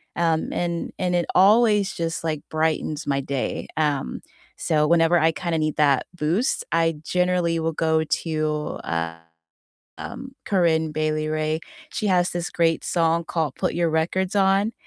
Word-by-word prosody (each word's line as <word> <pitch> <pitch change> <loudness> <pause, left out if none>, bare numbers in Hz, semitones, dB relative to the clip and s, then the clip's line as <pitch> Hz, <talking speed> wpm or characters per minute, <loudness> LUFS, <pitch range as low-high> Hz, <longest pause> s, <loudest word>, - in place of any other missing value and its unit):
um, 165 -2 0
and 170 -1 -2
and 180 -1 0
it 175 -1 +1
always 210 0 +5
just, 165 -1 -3
like, 155 -2 -2
brightens 155 -1 -1
my 140 -1 +1
day, 135 -1 -3
um, 145 - -1 0.4
so 150 -2 +2
whenever 170 +1 +4
I 160 0 +3
kinda 170 0 -2
need 155 -1 -1
that 140 -3 +3
boost, 175 - 0
I 165 -1 +2
generally 180 0 +1
will 165 0 0
go 160 0 +1
to, 155 -1 -2
uh, 85 0 -2 0.8
um, 265 0 -8
Corinne 160 -5 +1
Bailey 155 0 -1
Rae, 155 0 -1 0.3
she 210 - -2
has 180 -1 +2
this 175 0 -3
great 165 -1 +1
song 165 -1 +1
called 160 -4 -2
"Put - - -1
Your 170 0 +1
Records 175 +4 0
On," 195 +2 +3
165 Hz, 155 wpm, -23 LUFS, 155-175 Hz, 0.8 s, always